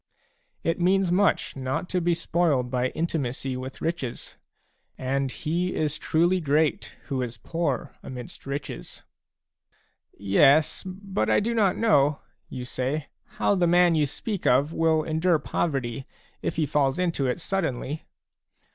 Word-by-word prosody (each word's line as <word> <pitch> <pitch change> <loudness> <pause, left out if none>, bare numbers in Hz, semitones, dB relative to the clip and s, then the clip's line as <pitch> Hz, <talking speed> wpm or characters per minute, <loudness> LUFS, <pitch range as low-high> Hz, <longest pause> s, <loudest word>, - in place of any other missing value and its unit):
It 165 +1 0
means 185 0 +3
much 195 +3 +2
not 130 +5 -2
to 180 - 0
be 170 0 +2
spoiled 160 -7 +1
by 125 0 +1
intimacy 135 -4 -2
with 130 +1 -7
riches; 160 -7 -3 0.6
and 135 0 -1
he 170 +10 -2
is 150 -1 -1
truly 175 +3 +2
great 150 0 +1
who 135 -3 -2
is 120 -1 -4
poor 165 -6 -2
amidst 125 +1 -9
riches. 140 - -6 0.6
" - - -42 0.4
Yes, 135 +10 +4
but 190 +1 -2
I - - +4
do 230 +3 -1
not 205 -5 +2
know," 150 -11 +3 0.3
you 125 -1 -6
say, 135 +4 -3 0.3
"how - - +3
the 180 -3 +2
man 175 0 +5
you 150 -2 +2
speak 200 +7 -3
of 140 +6 +3
will 160 -1 +2
endure 160 +2 +2
poverty, 135 -5 -2 0.3
if - - -2
he 160 -1 +1
falls 140 0 +1
into 170 -7 0
it 125 - -1
suddenly. 160 -5 -2
155 Hz, 145 wpm, -26 LUFS, 135-175 Hz, 0.6 s, man